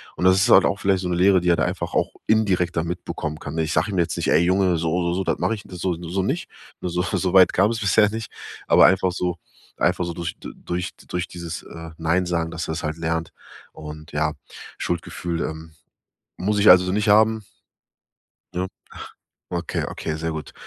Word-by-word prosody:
Und - - -2
das 95 0 +6
ist 95 - +3
halt - - +8
auch 100 - 0
vielleicht 95 -1 +1
so 90 - -3
'ne 90 - 0
Lehre, 95 +1 +4
die 90 - +1
er 85 - +5
da - - 0
einfach - - -4
auch - - +1
indirekt 95 -6 +2
dann 85 - +1
mitbekommen 80 -3 -5
kann, - - -7
ne? 80 - +1
Ich 80 +1 -2
sag - - +2
ihm 100 - -3
jetzt 85 -2 +1
nicht: - - -2
„Ey - - +5
Junge, 90 0 +2
so 85 +2 0
so 85 0 0
so 95 - -1
das - - 0
mach - - +1
ich 105 -3 -3
das 90 - -10
so 90 -1 -1
so 85 +3 -3
nicht.“ 145 - -2 0.3
Ne, 90 - -2
so 90 +1 -1
so 90 0 -1
weit 95 -2 +7
kam 100 +4 +3
es 115 - -3
bisher 105 +1 +3
nicht. 110 0 -6 0.4
Aber - - +7
einfach 95 0 +3
so 90 -1 -2 0.4
einfach 90 0 +1
so 85 - -4
durch 85 +1 -5
d - - -9
durch 90 0 -4 0.2
durch 90 0 -3
dieses, 85 -1 -7
äh, 80 0 -9
Neinsagen, 85 0 0
dass 85 -2 -4
er 80 - -2
das 80 - -5
halt 75 0 -3
lernt. 80 0 -2 0.4
Und 75 +1 -10
ja, 75 +1 0 0.4
Schuldgefühl, 85 0 -3
ähm, 80 0 -6 0.6
muss 105 +3 0
ich 105 - +5
also 90 0 +7
nicht 105 +2 0
haben? 110 +1 +4 1.1
Ne? 90 +1 -1 0.8
Okay, 85 -1 -2
okay, 80 - -4
sehr 80 +1 -3
gut. 80 -1 -6
90 Hz, 220 wpm, -23 LUFS, 85-95 Hz, 1.1 s, halt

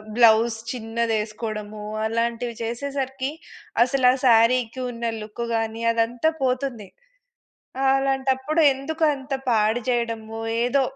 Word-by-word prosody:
Blouse 230 -1 +5
చిన్నదేసుకోవడము 220 -2 -3 0.2
అలాంటివి 230 +1 -1
చేసేసరికి 265 +2 -3 0.5
అసలు 255 0 +2
ఆ - - +2
శారీకి 235 +1 +4
ఉన్న 235 -1 -8 0.2
లుక్ 215 +2 -6
గాని 225 0 -2
అదంతా 235 +6 +1
పోతుంది. 250 -5 -1 1.0
అలాంటప్పుడు 270 +3 +1
ఎందుకంత 290 -1 -1 0.2
పాడుజేయడము. 225 0 0 0.3
ఏదో 270 +2 +2
235 Hz, 90 wpm, -23 LUFS, 225-265 Hz, 1.0 s, Blouse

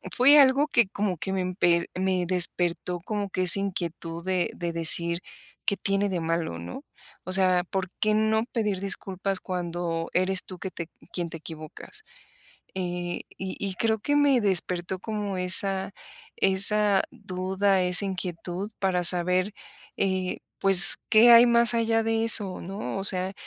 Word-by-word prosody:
fue 280 +4 +6
algo 275 +2 +4
que 235 -7 +2
como 200 -3 -3
que 190 +4 -5
me 190 - -2
empe 175 -2 0
me 185 -1 -1
despertó 175 0 0
como 205 0 -4
que 185 0 -3
esa 180 +2 +8
inquietud 170 -3 -6
de 185 -2 -1
de 170 -1 -4
decir: 170 +1 +4 0.4
"¿Qué 200 - 0
tiene 195 +1 -1
de 185 -2 -3
malo?", 165 - -3
¿no? 85 +10 -9 0.4
O 185 - -2
sea, 185 -2 +3
¿por 190 -1 -4
qué 215 0 +1
no 220 +1 0
pedir 210 -5 -2
disculpas 195 0 -4
cuando 175 -2 -4
eres 185 +1 0
tú 185 - -10
que 190 - -7
te 170 - -7
eq - - -32 0.2
quien 175 -2 -4
te 165 - -8
equivocas? 160 - -11 0.7
Eh, 175 -1 -5 0.2
y 190 0 -6
y 195 -2 -3
creo 220 +1 -1
que 290 +6 -1
me 285 -3 +3
despertó 185 -2 -1
como 205 -3 -5
esa 190 +1 +1 0.4
esa 200 +1 +4
duda, 190 -3 -2
esa 180 +2 +4
inquietud 185 +1 -6
para 180 -2 -1
saber, 180 +3 +2 0.4
eh, 190 -1 -2 0.2
pues, 195 -1 +7
¿qué 230 +2 +6
hay 235 +1 +7
más 235 0 +3
allá 225 -1 0
de 225 0 -1
eso?, 205 -4 +2
¿no? 195 +2 -6
O 195 - -5
sea, 185 -1 -2
190 Hz, 160 wpm, -25 LUFS, 180-205 Hz, 0.7 s, esa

